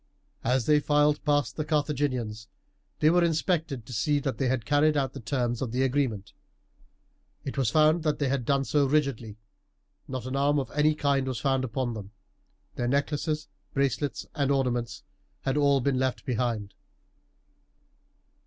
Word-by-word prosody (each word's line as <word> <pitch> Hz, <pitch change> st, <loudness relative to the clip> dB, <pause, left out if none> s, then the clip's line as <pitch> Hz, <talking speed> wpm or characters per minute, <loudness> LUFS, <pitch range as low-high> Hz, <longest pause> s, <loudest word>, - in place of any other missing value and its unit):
As 125 Hz, 0 st, +1 dB
they 150 Hz, -1 st, +5 dB
filed 150 Hz, 0 st, +2 dB
past 145 Hz, -3 st, +1 dB
the 155 Hz, -, 0 dB
Carthaginians 140 Hz, -8 st, -1 dB, 0.5 s
they 155 Hz, -, +5 dB
were 175 Hz, 0 st, +4 dB
inspected 160 Hz, -, 0 dB
to 125 Hz, -, -9 dB
see 145 Hz, +7 st, +1 dB
that 135 Hz, -1 st, -3 dB
they 135 Hz, -, +1 dB
had 125 Hz, -3 st, -1 dB
carried 145 Hz, +1 st, +3 dB
out 135 Hz, -1 st, 0 dB
the 140 Hz, -, -7 dB
terms 120 Hz, -1 st, -1 dB
of 125 Hz, -4 st, -2 dB
the 130 Hz, +2 st, +1 dB
agreement. 130 Hz, -7 st, -1 dB, 1.1 s
It 135 Hz, -, -4 dB
was 135 Hz, -5 st, +1 dB
found 155 Hz, +4 st, +4 dB
that 155 Hz, -2 st, 0 dB
they 140 Hz, -, 0 dB
had 135 Hz, -1 st, 0 dB
done 140 Hz, +2 st, +1 dB
so 145 Hz, 0 st, +2 dB
rigidly 130 Hz, -7 st, 0 dB, 0.7 s
not 130 Hz, -2 st, -5 dB
an 130 Hz, +1 st, -3 dB
arm 140 Hz, +1 st, +2 dB
of 135 Hz, -, -2 dB
any 150 Hz, +1 st, +2 dB
kind 140 Hz, -3 st, +1 dB
was 130 Hz, -3 st, -2 dB
found 135 Hz, -2 st, +1 dB
upon 125 Hz, 0 st, -2 dB
them. 105 Hz, -2 st, -8 dB, 0.6 s
Their 120 Hz, -, -1 dB
necklaces, 150 Hz, +3 st, -1 dB, 0.3 s
bracelets, 140 Hz, +1 st, -1 dB
and 140 Hz, -2 st, 0 dB
ornaments 125 Hz, -4 st, -1 dB, 0.4 s
had 135 Hz, -, -1 dB
all 140 Hz, -2 st, +3 dB
been 130 Hz, 0 st, +1 dB
left 130 Hz, -1 st, -1 dB
behind. 115 Hz, -5 st, -2 dB
135 Hz, 165 wpm, -27 LUFS, 125-145 Hz, 1.1 s, they